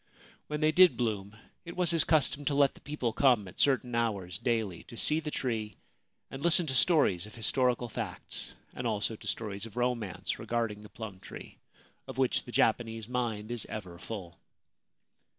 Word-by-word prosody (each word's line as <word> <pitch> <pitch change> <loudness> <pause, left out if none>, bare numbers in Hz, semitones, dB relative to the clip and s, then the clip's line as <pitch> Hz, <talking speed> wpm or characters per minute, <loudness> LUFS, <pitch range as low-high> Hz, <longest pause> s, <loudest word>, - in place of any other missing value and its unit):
When 150 0 -3
they 155 0 +4
did 180 +2 +6
bloom 105 -3 -2 0.3
it 170 -1 -8
was 180 -2 +3
his 165 -1 +5
custom 145 -2 +2
to 140 - +1
let 140 -1 +4
the - - -18
people 135 -6 -2
come 120 -5 +3
at 90 - -13
certain 130 -3 +2
hours 100 -6 -1
daily 110 -7 -1
to 115 - -11
see 155 +6 +4
the 155 -1 -4
tree 115 -7 -3 0.5
and 135 - -7
listen 170 +2 +5
to 140 - -2
stories 125 - +4
of 105 - -13
historical 125 +1 +2
facts, 115 - -6 0.2
and 125 - -3
also 110 0 -1
to - - -11
stories 105 -1 -3
of 115 - -15
romance, 120 -5 -2
regarding 115 -3 -2
the 105 - -12
plum 105 -4 -8
tree, - - -11 0.5
of 130 -2 -8
which 130 -2 +1
the 120 - -9
Japanese 115 -1 +1
mind 120 -3 -2
is 120 -3 -3
ever 90 -5 -7
full. 90 -6 -7
115 Hz, 180 wpm, -30 LUFS, 105-135 Hz, 0.5 s, did